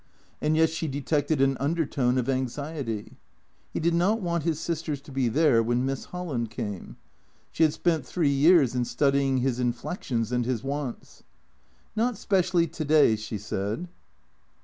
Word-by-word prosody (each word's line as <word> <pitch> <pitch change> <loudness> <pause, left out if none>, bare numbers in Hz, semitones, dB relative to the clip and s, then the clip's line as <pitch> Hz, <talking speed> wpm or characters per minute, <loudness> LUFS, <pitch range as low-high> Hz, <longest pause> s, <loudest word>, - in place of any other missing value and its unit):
And 155 +1 +2
yet 160 0 +4
she 165 0 -3
detected 145 +1 0
an 135 -1 +3
undertone 140 -4 0
of 125 -1 0
anxiety. 130 -3 -3 0.5
He - - -3
did 170 +1 +1
not 190 +7 +2
want 170 -5 -2
his 160 -3 0
sisters 160 -4 -3
to 140 - -14
be 130 -2 0
there 130 -1 +4
when 120 +2 0
Miss 135 0 -3
Holland 150 -11 -4
came. 105 -4 -6 0.5
She - - -4
had 155 -2 +5
spent 165 -5 0
three 160 -6 0
years 145 -2 +5
in 125 -1 0
studying 140 0 +2
his 125 -1 0
inflections 120 - -2
and 125 0 +1
his 125 -1 -2
wants. 140 -2 -5 0.4
" - - -37
Not 230 0 0
specially 185 -3 +2
to 165 0 -5
day," 150 -6 +5
she 110 0 -5
said. 105 - -4
140 Hz, 165 wpm, -26 LUFS, 125-165 Hz, 0.5 s, had